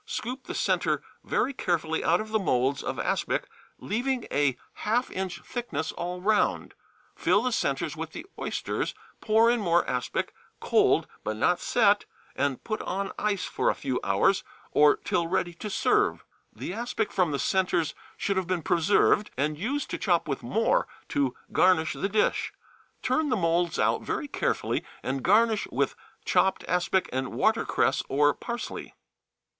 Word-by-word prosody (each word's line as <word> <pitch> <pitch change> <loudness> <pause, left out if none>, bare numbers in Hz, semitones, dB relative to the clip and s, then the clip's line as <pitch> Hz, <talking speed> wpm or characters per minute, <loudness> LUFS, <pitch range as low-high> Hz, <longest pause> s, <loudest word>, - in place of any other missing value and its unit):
Scoop 255 +3 -4
the - - -5
centre - - +1 0.2
very 280 - 0
carefully 165 -8 -1
out 170 +2 +3
of 215 - -5
the 220 0 +1
moulds 135 -6 +1
of - - -4
aspic, - - -1 0.3
leaving 245 +3 -1
a 140 -3 +2 0.2
half 235 +4 +1
inch 190 -1 -4
thickness 160 - -4
all 180 +1 -4
round, 210 +2 +1 0.4
fill 205 - +2
the 255 - 0
centres 155 - -1
with 160 0 -5
the - - -8
oysters, - - -2 0.2
pour 225 +1 +4
in 240 - +1
more 175 -4 +2
aspic, 125 -1 -2 0.3
cold, - - +3 0.2
but 110 - -3
not 180 +10 +2
set, 205 -4 +3 0.3
and 140 -2 -1
put 215 -1 -3
on 195 +1 -3
ice 205 -3 0
for - - 0
a - - +1
few 130 -3 -2
hours, 100 - +2 0.3
or 150 0 +6
till 170 -1 -1
ready 175 0 0
to 210 +5 -6
serve. - - +1 0.3
The - - -6
aspic 230 -1 -2
from 180 -3 +2
the 145 - -1
centres 180 0 +1 0.2
should 200 -1 -1
have 190 -2 0
been 180 -3 -1
preserved 190 +4 +3
and 150 +3 0
used 255 - -3
to - - -3
chop 175 -7 +1
with 135 -3 -2
more 220 - +1 0.2
to 135 -3 0 0.2
garnish 180 -4 +3
the 195 - -2
dish. 210 +1 +1 0.5
Turn 315 -2 +1
the 250 - +2
moulds 170 -1 +1
out - - +2
very 295 - -3
carefully, - - -1 0.2
and 135 +1 -2
garnish 215 - +3
with - - 0 0.3
chopped 190 - +2
aspic 180 +1 +1
and 130 0 -2
watercress - - +2
or 145 +1 +4
parsley. 235 +7 -6
185 Hz, 160 wpm, -27 LUFS, 155-215 Hz, 0.5 s, or